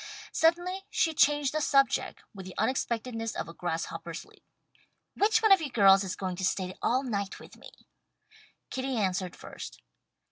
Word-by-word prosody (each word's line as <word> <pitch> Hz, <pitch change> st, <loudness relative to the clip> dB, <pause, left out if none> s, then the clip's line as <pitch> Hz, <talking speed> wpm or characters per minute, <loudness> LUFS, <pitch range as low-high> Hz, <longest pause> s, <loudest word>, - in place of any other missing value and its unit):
Suddenly 350 Hz, +3 st, +2 dB
she 330 Hz, -6 st, +1 dB
changed 290 Hz, -1 st, +3 dB
the 310 Hz, -, 0 dB
subject, 275 Hz, -2 st, +2 dB
with 190 Hz, -2 st, -9 dB
the 185 Hz, -, -10 dB
unexpectedness 230 Hz, -3 st, -1 dB
of -, -, -3 dB
a 165 Hz, -, -9 dB
grasshopper's 165 Hz, -2 st, -4 dB
leap. -, -, -22 dB, 0.7 s
"Which 440 Hz, +2 st, +3 dB
one 435 Hz, -, +5 dB
of 385 Hz, -3 st, +7 dB
you 300 Hz, -, -3 dB
girls 195 Hz, -4 st, +6 dB
is 190 Hz, -, -4 dB
going 185 Hz, -2 st, -4 dB
to 190 Hz, -, -4 dB
stay 185 Hz, 0 st, -1 dB
all 255 Hz, +3 st, +1 dB
night 200 Hz, -6 st, -3 dB
with -, -, -14 dB
me?" -, -, -13 dB, 1.0 s
Kitty 260 Hz, -1 st, -2 dB
answered 185 Hz, -3 st, -1 dB
first. -, -, -9 dB
240 Hz, 165 wpm, -29 LUFS, 190-295 Hz, 1.0 s, of